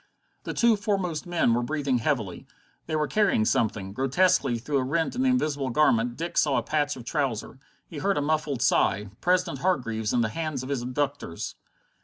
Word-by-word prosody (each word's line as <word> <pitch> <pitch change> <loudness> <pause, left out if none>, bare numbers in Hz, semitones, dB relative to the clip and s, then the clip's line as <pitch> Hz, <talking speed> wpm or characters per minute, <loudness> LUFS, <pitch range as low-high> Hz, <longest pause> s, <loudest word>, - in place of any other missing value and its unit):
The - - -4
two 235 -2 +4
foremost 195 -6 -2
men 175 -9 +2
were 120 - +1
breathing 140 -1 0
heavily. 110 - -2 0.4
They 160 - -2
were 150 -1 +1
carrying 200 - +2
something. 100 -4 0
Grotesquely 135 - +2
through 140 +4 -1
a - - 0
rent 160 - -1
in 255 - -1
the 265 - +3
invisible 150 - 0
garment 120 -3 +2
Dick 170 +2 -1
saw 145 -3 +2
a - - 0
patch 145 -1 0
of 125 -3 -10
trouser. 135 -5 -2 0.3
He 155 - -7
heard 195 +5 +1
a - - +3
muffled 150 -4 0
sigh. 105 -6 +2
President 180 0 +1
Hargreaves, 115 - 0
in 120 - +2
the 110 - +1
hands 155 -1 -3
of 130 - -7
his 140 -3 -1
abductors! 130 - -3
145 Hz, 190 wpm, -26 LUFS, 120-165 Hz, 0.4 s, two